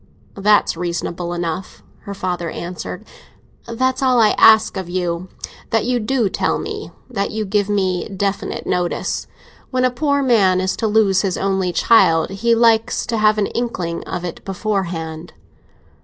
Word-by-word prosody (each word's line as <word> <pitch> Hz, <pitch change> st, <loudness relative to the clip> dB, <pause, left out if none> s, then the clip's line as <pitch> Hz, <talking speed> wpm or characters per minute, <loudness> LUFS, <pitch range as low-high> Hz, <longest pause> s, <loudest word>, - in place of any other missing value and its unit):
"That's 205 Hz, -1 st, +3 dB
reasonable 175 Hz, 0 st, -3 dB
enough," 175 Hz, +1 st, -4 dB, 0.2 s
her 200 Hz, -1 st, -6 dB
father 180 Hz, -3 st, -3 dB
answered. 180 Hz, +4 st, -6 dB, 0.6 s
"That's 260 Hz, +3 st, -1 dB
all 255 Hz, -2 st, +3 dB
I 215 Hz, -2 st, +5 dB
ask 220 Hz, -1 st, +6 dB
of 190 Hz, -3 st, -5 dB
you—that 180 Hz, +5 st, -3 dB
you 250 Hz, 0 st, +1 dB
do 235 Hz, 0 st, 0 dB
tell -, -, 0 dB
me, -, -, -6 dB, 0.2 s
that 200 Hz, -6 st, -2 dB
you 215 Hz, 0 st, -3 dB
give 205 Hz, 0 st, 0 dB
me 190 Hz, -3 st, 0 dB
definite 195 Hz, 0 st, -3 dB
notice. 180 Hz, -1 st, -2 dB, 0.4 s
When 255 Hz, -1 st, +1 dB
a 255 Hz, -, +2 dB
poor 280 Hz, +2 st, 0 dB
man 200 Hz, -8 st, +3 dB
is 185 Hz, 0 st, -1 dB
to 225 Hz, -, 0 dB
lose 210 Hz, -3 st, +3 dB
his 190 Hz, -3 st, -1 dB
only 190 Hz, -2 st, 0 dB
child, 170 Hz, -3 st, +4 dB
he 230 Hz, +4 st, +1 dB
likes 230 Hz, -1 st, +2 dB
to 235 Hz, -2 st, -2 dB
have 215 Hz, 0 st, +4 dB
an 210 Hz, -, +2 dB
inkling 185 Hz, -9 st, -3 dB
of 180 Hz, -, -4 dB
it 175 Hz, -, -7 dB
beforehand." 175 Hz, -5 st, -3 dB
195 Hz, 155 wpm, -19 LUFS, 180-225 Hz, 0.6 s, ask